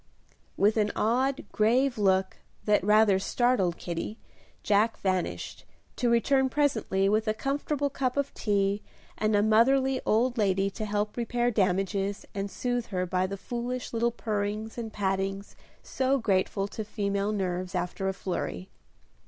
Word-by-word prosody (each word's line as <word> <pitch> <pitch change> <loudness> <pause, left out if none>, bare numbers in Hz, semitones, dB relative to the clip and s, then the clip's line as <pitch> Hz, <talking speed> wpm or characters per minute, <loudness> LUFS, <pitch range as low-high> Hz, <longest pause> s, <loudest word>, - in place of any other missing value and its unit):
With 210 +3 +3
an 210 -1 +2
odd, 260 +6 +1
grave 245 +5 +2
look, 190 -1 +2 0.3
that 210 -3 +3
rather 210 -1 +5
startled 195 -4 +1
Kitty, 175 +5 -5 0.5
Jack 210 +2 +2
vanished, 185 -2 -2 0.3
to 245 - +1
return 265 +3 +3
presently 225 -9 +1
with 215 +2 +1
a 215 - +1
comfortable 285 +2 -1
cup 260 -1 -1
of 280 0 -1
tea 200 -1 0 0.3
and 215 0 +1
a 205 - +3
motherly 260 +5 +3
old 240 +3 +1
lady 195 -1 +2
to 215 +2 -5
help 210 0 -2
repair 240 +1 0
damages 195 0 0
and 200 -1 -3
soothe 245 +2 -2
her 185 -2 -2
by 185 +1 0
the 200 +1 -5
foolish 245 +4 -4
little 235 +1 +2
purrings 215 -1 -3
and 230 -2 -5
pattings 195 0 -2 0.3
so 265 +1 +1
grateful 195 -3 0
to 220 - -5
female 200 -1 -1
nerves 185 -2 -2
after 180 +2 -2
a 190 - 0
flurry. 175 - -4
210 Hz, 145 wpm, -28 LUFS, 195-240 Hz, 0.5 s, rather